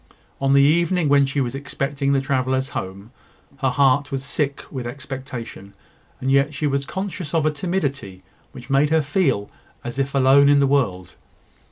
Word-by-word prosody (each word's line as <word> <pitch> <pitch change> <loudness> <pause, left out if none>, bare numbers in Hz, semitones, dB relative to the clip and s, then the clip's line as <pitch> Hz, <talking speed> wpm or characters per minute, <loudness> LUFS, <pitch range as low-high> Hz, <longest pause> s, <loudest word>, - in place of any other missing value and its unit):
On 135 0 +2
the 140 0 +6
evening 170 +2 +2
when 140 -1 +4
she 140 +1 -1
was 120 -2 -2
expecting 140 0 -2
the 140 - +3
travellers 130 0 -1
home, 100 +4 -6 0.5
her 135 -2 0
heart 140 +2 +2
was 135 -1 -3
sick 140 0 -2
with 130 -4 -5
expectation; 130 -6 -8 0.4
and 130 +1 -1
yet 140 +2 +2
she 150 - -2
was 140 -1 -1
conscious 190 -4 -5
of 160 -2 +2
a 155 - +3
timidity 145 - -3 0.3
which 125 -2 -11
made 140 +2 +3
her 160 -1 +2
feel 140 - 0 0.4
as 120 +3 -6
if 140 +1 -2
alone 135 +1 +5
in 145 - +5
the 140 - +4
world. 100 -11 0
140 Hz, 175 wpm, -22 LUFS, 130-145 Hz, 0.5 s, the